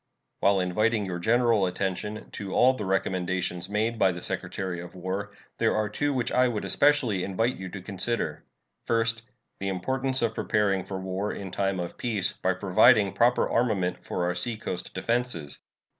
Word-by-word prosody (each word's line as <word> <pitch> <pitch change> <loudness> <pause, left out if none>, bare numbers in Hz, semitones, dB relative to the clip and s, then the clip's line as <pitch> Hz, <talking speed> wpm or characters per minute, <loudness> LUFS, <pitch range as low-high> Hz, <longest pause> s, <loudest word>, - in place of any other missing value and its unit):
While 100 -1 +4
inviting 105 +4 +1
your 90 -2 -4
general 115 -1 +3
attention 95 +3 -3
to 100 -2 -5
all 130 +1 +6
the 105 -6 -5
recommendations 90 -1 -1
made 110 +2 0
by 95 - +5
the 90 - -6
Secretary 90 -3 -3
of 90 - -10
War, 95 +3 -4 0.3
there - - +2
are 110 -1 0
two 145 +7 0
which 125 -2 -1
I 125 +1 +4
would 115 -4 -2
especially 130 -10 +3
invite 115 +6 0
you 95 0 -6
to 95 0 -8
consider: 100 +4 -2 0.4
First, 115 0 +1 0.4
the 100 - -3
importance 130 +7 -1
of 115 -1 +1
preparing 100 -4 +1
for 95 -1 -5
war 95 +2 -2
in 95 -2 -6
time 95 -1 0
of 85 -1 -5
peace 110 -6 -1
by 95 - 0
providing 100 +2 +5
proper 120 +1 +3
armament 105 -7 0
for 90 - -2
our 90 - +1
seacoast 95 -2 -4
defenses. 115 - -2
100 Hz, 170 wpm, -27 LUFS, 95-115 Hz, 0.4 s, all